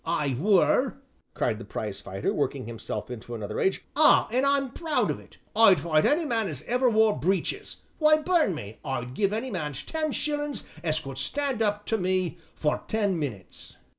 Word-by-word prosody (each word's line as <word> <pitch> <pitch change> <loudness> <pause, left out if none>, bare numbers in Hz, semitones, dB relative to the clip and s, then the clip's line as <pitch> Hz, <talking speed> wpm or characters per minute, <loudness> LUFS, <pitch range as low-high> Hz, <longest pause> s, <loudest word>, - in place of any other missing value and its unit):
"I 150 -5 0
were," 195 +2 +3 0.4
cried - - 0
the - - -7
prizefighter, - - -4
working - - -1
himself 115 +2 -5
into 120 0 -7
another 105 -3 -5
rage, 190 - 0
"ah! 305 +1 +6
an' 255 +3 +2
I'm 275 -2 +2
proud 320 +2 0
of - - -4
it. - - -18 0.2
I'd 205 -6 +7
fight 155 0 +2
any 315 +3 +2
man 225 -6 0
as 145 -7 -5
ever 250 +1 +2
wore 220 -1 +4
breeches 195 - -1 0.2
why, 305 -1 +6
burn 310 - +2
me! 105 -6 -8
I'd 125 -2 -3
give 200 +6 +1
any 230 +4 -3
man 150 -7 -3
ten 310 - -3
shillin' 295 0 -2 0.3
as 155 -2 +1
could 135 -4 -7
stand 275 - -1
up 210 -1 0
to 225 - 0
me 185 -2 0 0.2
for 150 -1 0
ten 205 -5 0
minutes." 115 - -6
200 Hz, 180 wpm, -27 LUFS, -, 0.4 s, I'd